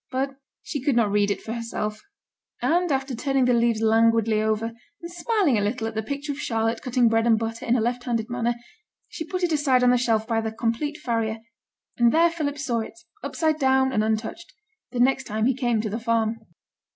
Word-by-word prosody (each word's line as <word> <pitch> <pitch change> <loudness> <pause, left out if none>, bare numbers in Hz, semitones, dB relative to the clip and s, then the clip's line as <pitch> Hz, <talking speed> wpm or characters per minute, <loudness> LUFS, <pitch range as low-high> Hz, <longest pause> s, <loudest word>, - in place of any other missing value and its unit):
But 265 +1 -1 0.3
she 285 - -4
could 275 -1 +1
not 225 -4 +3
read 205 0 +2
it 200 - -2
for 225 - -4
herself; 225 -2 -4 0.6
and 350 0 +1
after 270 0 -1
turning 270 +1 +1
the 250 - +3
leaves 235 -2 +2
languidly 225 -1 +3
over, 220 +1 0 0.3
and 340 0 -8
smiling 350 - +1
a - - 0
little 220 +3 -1
at 225 - -3
the 220 - -1
picture 280 +6 -4
of 285 - -6
Charlotte 225 -2 -1
cutting 250 -1 +2
bread 225 +1 +2
and 225 -1 +5
butter 225 +1 -4
in 235 - +3
a - - +2
left 245 +2 -1
handed 230 -3 -1
manner, 240 -1 -1 0.5
she - - -5
put 365 +1 -3
it 350 - +2
aside 275 -5 +3
on 250 - +5
the 250 - +3
shelf 225 -3 +1
by 225 -1 0
the 220 0 -3
Complete 235 +7 -2
Farrier; 225 -2 -1 0.6
and 235 -1 +4
there 335 +3 +4
Philip 295 -4 -3
saw 255 -5 -1
it, 220 - -7 0.3
upside 315 -2 0
down 265 -1 +3
and 215 -4 +1
untouched, 220 +10 -3 0.4
the 245 - -5
next 265 +1 +3
time 215 +1 -1
he 265 - +3
came 240 -3 0
to 215 - -3
the 225 - -2
farm. 230 -1 0
235 Hz, 215 wpm, -24 LUFS, 225-270 Hz, 0.6 s, and